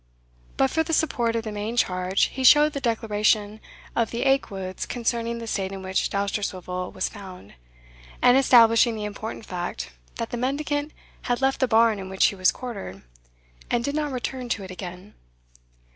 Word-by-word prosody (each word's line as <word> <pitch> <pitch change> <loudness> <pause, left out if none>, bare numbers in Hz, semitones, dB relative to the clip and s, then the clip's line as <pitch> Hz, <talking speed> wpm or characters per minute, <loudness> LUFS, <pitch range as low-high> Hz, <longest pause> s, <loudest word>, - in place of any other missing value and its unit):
But 270 -1 +3
for 320 - +2
the 325 +1 -2
support 240 -8 +1
of 230 - -1
the 215 - -5
main 210 +3 -4
charge, 185 -2 +1
he 265 - -3
showed 295 +3 +7
the 280 - -4
declaration 215 -2 +1 0.4
of 230 -1 +1
the 235 - -2
Aikwoods 195 -9 -1
concerning 235 -1 -2
the 230 - -6
state 195 -3 -2
in 195 -1 -7
which 190 0 0
Dousterswivel 190 -2 -3
was 185 - -2
found, 185 - -11 0.7
and 245 - +5
establishing 235 -3 +6
the 210 -1 -4
important 215 +2 -6
fact 175 -1 -5 0.2
that 230 - -4
the 240 - -3
mendicant 290 +4 -1 0.4
had 245 - +1
left 270 0 +1
the 260 - +2
barn 225 -2 +4
in 190 -1 -7
which 190 0 +3
he - - +2
was 185 -1 +3
quartered, 200 - -7 0.7
and 240 -1 +1
did 280 - -2
not 300 -1 -1
return 255 0 -4
to 205 - -2
it 190 - -8
again. 185 +2 -9
225 Hz, 175 wpm, -25 LUFS, 195-250 Hz, 0.7 s, showed